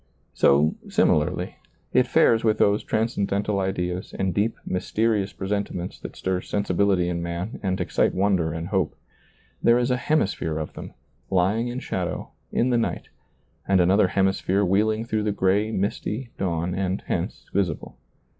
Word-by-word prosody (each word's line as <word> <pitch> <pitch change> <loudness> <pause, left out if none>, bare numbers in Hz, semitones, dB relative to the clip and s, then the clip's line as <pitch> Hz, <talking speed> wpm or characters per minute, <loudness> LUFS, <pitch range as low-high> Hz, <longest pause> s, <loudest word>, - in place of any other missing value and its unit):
So, 75 +3 +4 0.2
similarly, - - +1 0.4
it - - +4
fares 115 0 +4
with 110 -1 +3
those 100 0 +3
transcendental 105 -2 0
ideas 90 -1 -2
and 95 -2 0
deep, 105 +5 0
mysterious 105 +2 0
presentiments 95 -2 -3
that - - -8
stir 95 -1 -1
sensibility 95 -2 +1
in 85 -1 -2
man 85 +5 -4
and 95 -1 -1
excite 90 - +1
wonder 95 -4 +2
and 80 +2 -5
hope. 95 -5 0 0.7
There 120 0 +5
is 125 +1 +1
a 125 - +2
hemisphere 100 - 0
of 80 -1 -4
them, - - -9 0.3
lying 95 +6 +2
in 120 +1 -4
shadow, 90 -2 -3 0.2
in 125 +2 +1
the 120 - +3
night, 115 - -2 0.6
and 95 -1 +4
another 95 +3 +4
hemisphere 95 +1 +1
wheeling 110 +4 +1
through 110 -2 -1
the 105 0 0
gray, 100 +2 +2
misty 110 +4 -2
dawn 85 -1 -1
and 95 0 -2
hence - - -3
visible. 90 -5 -1
95 Hz, 150 wpm, -24 LUFS, 90-105 Hz, 0.7 s, There